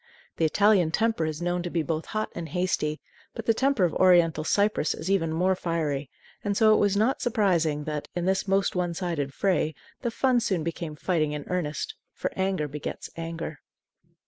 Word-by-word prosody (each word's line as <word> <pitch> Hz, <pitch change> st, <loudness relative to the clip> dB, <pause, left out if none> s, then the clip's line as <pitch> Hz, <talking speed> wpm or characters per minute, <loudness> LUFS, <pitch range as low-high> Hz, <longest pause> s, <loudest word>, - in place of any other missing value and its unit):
The 165 Hz, -, +2 dB
Italian 195 Hz, +1 st, +4 dB
temper 220 Hz, -2 st, +1 dB
is 155 Hz, +2 st, -4 dB
known 175 Hz, 0 st, 0 dB
to 175 Hz, -, -4 dB
be 170 Hz, -2 st, 0 dB
both 155 Hz, +2 st, -3 dB
hot 215 Hz, 0 st, -2 dB
and 170 Hz, -2 st, -6 dB
hasty; 155 Hz, -3 st, -1 dB, 0.4 s
but 230 Hz, -, -6 dB
the 225 Hz, -, +4 dB
temper 265 Hz, -2 st, +2 dB
of 175 Hz, -, +2 dB
oriental 170 Hz, -4 st, +4 dB
Cyprus 200 Hz, -1 st, +1 dB
is 170 Hz, +5 st, -3 dB
even 165 Hz, -5 st, +2 dB
more 180 Hz, +4 st, +2 dB
fiery, 155 Hz, -6 st, -2 dB, 0.3 s
and 200 Hz, -1 st, 0 dB
so 220 Hz, -1 st, +6 dB
it -, -, +4 dB
was 205 Hz, -1 st, +2 dB
not 225 Hz, +6 st, +2 dB
surprising 175 Hz, -, +1 dB
that, 150 Hz, -1 st, -4 dB
in 175 Hz, -1 st, -1 dB
this 190 Hz, +2 st, +1 dB
most 195 Hz, 0 st, +2 dB
one 175 Hz, -2 st, -1 dB
sided 165 Hz, -6 st, -2 dB
fray, 170 Hz, -2 st, 0 dB, 0.3 s
the 240 Hz, -, 0 dB
fun 250 Hz, +1 st, +2 dB
soon 190 Hz, -8 st, 0 dB
became 165 Hz, -1 st, -4 dB
fighting 155 Hz, -2 st, 0 dB
in 150 Hz, -1 st, -5 dB
earnest; 180 Hz, -, -2 dB, 0.2 s
for -, -, -3 dB
anger 190 Hz, -5 st, 0 dB
begets 145 Hz, +1 st, -6 dB
anger. 165 Hz, -2 st, -5 dB
175 Hz, 190 wpm, -27 LUFS, 155-200 Hz, 0.4 s, so